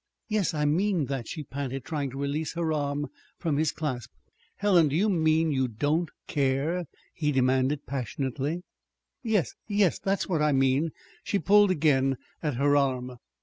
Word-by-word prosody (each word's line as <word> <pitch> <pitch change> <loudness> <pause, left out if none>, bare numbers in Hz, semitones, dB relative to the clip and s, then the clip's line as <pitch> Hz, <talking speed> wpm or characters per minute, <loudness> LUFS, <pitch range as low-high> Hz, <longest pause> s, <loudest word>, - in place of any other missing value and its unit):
"Yes, 210 -7 0
I 150 -1 +1
mean 175 +2 +2
that," 135 -4 -3
she 155 - -5
panted, 135 -2 -5
trying 145 -4 -2
to 135 - -8
release 140 +3 -2
her 165 -2 -1
arm 145 -1 -1 0.3
from 155 -4 -1
his 155 0 +2
clasp. 130 -7 -4 0.5
"Helen! 185 -6 +4
Do 145 - -2
you 205 +6 +3
mean 160 -3 +2
you 130 -2 +1
don't 145 +9 0 0.2
care?" 145 +5 0 0.3
he 150 -3 0
demanded 130 +2 +1
passionately. 135 +5 -3 0.6
"Yes, 220 - 0
yes 205 -5 +2
that's 195 0 -1
what 165 -5 0
I 150 -1 +3
mean." 135 +4 +2 0.3
She 205 - 0
pulled 205 +3 +5
again 140 -6 +2 0.2
at 150 -5 -1
her 145 +3 +3
arm. 130 -3 0
150 Hz, 160 wpm, -27 LUFS, 135-170 Hz, 0.6 s, pulled